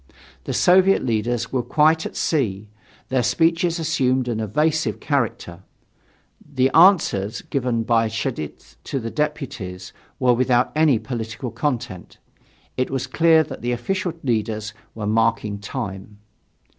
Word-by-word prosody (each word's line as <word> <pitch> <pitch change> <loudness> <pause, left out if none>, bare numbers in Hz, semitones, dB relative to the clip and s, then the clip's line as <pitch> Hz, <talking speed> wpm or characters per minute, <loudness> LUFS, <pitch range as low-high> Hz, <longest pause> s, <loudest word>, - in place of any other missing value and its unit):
The - - -3
Soviet 190 -1 +4
leaders 115 +1 -1
were 130 - +1
quite 155 +5 +2
at - - -12
sea; 105 - -1 0.4
their 130 -1 +1
speeches 165 - +1
assumed 130 -6 0
an 115 -2 -2
evasive 150 +9 0
character; 115 - -2 0.8
the 135 -2 0
answers 140 - +4
given 125 -4 -1
by 115 -1 +2
Cheidze 110 - -5
to 135 - -2
the 115 -1 -5
deputies 120 -12 -4 0.3
were 125 -1 +4
without 125 0 +2
any 155 -5 +4
political 115 0 -5
content. 120 - -4 0.6
It 130 - 0
was 135 -1 -2
clear 160 -1 +4
that - - -9
the 120 +1 -1
official 175 +8 -2
leaders 110 -3 -2 0.2
were 110 -2 -5
marking 110 -1 0
time. 100 0 -6
125 Hz, 130 wpm, -22 LUFS, 110-150 Hz, 0.8 s, Soviet